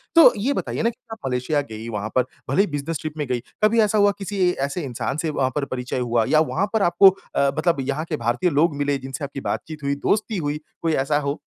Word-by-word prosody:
तो 330 - +9
ये 270 +6 +1
बताइए - - -3
ना 230 - +3
कि 235 - -9 0.2
आप 225 - -5
मलेशिया 130 +4 0
गई 110 +1 -7
वहाँ 105 -1 -3
पर 130 -1 +3 0.2
भले 195 - +4
ही 205 - +1
बिजनेस 145 +3 -2
ट्रिप 155 0 -5
में 150 - -1
गई। 125 -1 0 0.2
कभी 220 +2 +4
ऐसा 215 0 +2
हुआ 205 0 +5
किसी 200 0 -5 0.3
ऐसे 170 +4 -4
इंसान 135 +1 -3
से 160 - -1
वहाँ 135 -3 0
पर 145 -2 0
परिचय 125 -1 -3
हुआ 120 -2 +1
या 155 - +5
वहाँ 195 +5 +1
पर 220 - +2
आपको 185 +1 +7 0.3
अ, 140 - +3
मतलब 165 -3 +1
यहाँ 150 +3 -1
के 155 - -1
भारतीय 120 +9 +1
लोग 150 +1 +2
मिले 145 0 0
जिनसे 135 +1 -7
आपकी 140 0 -5
बातचीत 155 +1 -4
हुई, 140 0 0
दोस्ती 210 +8 0
हुई, 145 -2 -2 0.2
कोई 165 -1 +1
ऐसा 145 +2 +1
हो? 140 0 -3
145 Hz, 245 wpm, -23 LUFS, 135-180 Hz, 0.3 s, तो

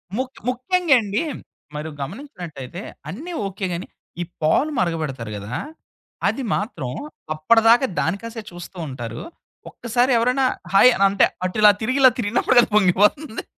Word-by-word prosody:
ముక్ 260 +2 -4
ముఖ్యంగా 330 +5 +2
అండి. 205 0 -1 0.5
మీరు 150 +2 -4
గమనించినట్లయితే, 175 - -7 0.3
అన్నీ 315 - -7
ఓకే 195 0 -4
గాని, 170 +2 -5 0.3
ఈ - - 0 0.2
పాలు 210 - +2
మరగబెడతారు 155 -10 -2
గదా! 105 +5 -6 0.7
అది 270 - -1
మాత్రం 165 - -4 0.4
అప్పడిదాకా 225 - +4
దానికాసే 225 +6 -3
చూస్తుంటారు. 140 - -7 0.5
ఒక్కసారి 245 +2 0
ఎవరైనా 250 +3 +2 0.3
హాయ్ 225 +6 +8 0.2
అంటే 200 - +4 0.2
అటు 185 - -3
ఇలా 210 -1 +9
తిరిగి 255 +5 0
ఇలా 260 -1 +8
తిరిగినప్పుడుకది 235 +2 +3
పొంగిపోతుంది. 210 - +2
205 Hz, 120 wpm, -22 LUFS, 165-250 Hz, 0.7 s, ఇలా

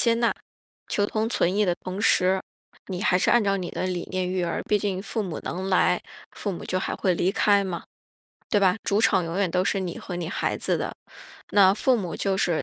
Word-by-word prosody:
接 230 -1 +4
纳， 235 0 +2 0.6
求 205 - +1
同 215 +2 -1
存 185 -5 +1
异 210 +1 +3
的 175 -3 +1
同 185 +2 -4
时， 190 -2 +3 0.5
你 185 -1 -4
还 180 -3 +3
是 - - +2
按 240 - +5
照 195 -1 +1
你 180 -3 -4
的 - - -3
理 180 -2 -3
念 185 -1 -1
育 185 -1 -1
儿， 170 - -2
毕 210 - +3
竟 195 -2 -2
父 220 +2 -3
母 180 -6 -5
能 185 +2 -4
来， 185 - +3 0.3
父 200 - -4
母 175 - -7
就 185 - -1
还 - - -2
会 185 -2 +1
离 175 +2 +1
开 205 -2 +3
嘛， 180 -3 -4 0.7
对 210 - +3
吧？ 190 -1 +4
主 200 +1 +2
场 195 -4 +4
永 165 +1 -4
远 195 -3 +1
都 180 +2 +1
是 195 0 +1
你 180 -3 -4
和 180 - -6
你 170 -2 -4
孩 - - -1
子 - - 0
的， - - -2 0.6
那 195 -1 +6
父 255 +4 +2
母 185 -6 -4
就 195 -1 0
是 170 -5 +1
190 Hz, 250 characters per minute, -25 LUFS, 180-205 Hz, 0.7 s, 那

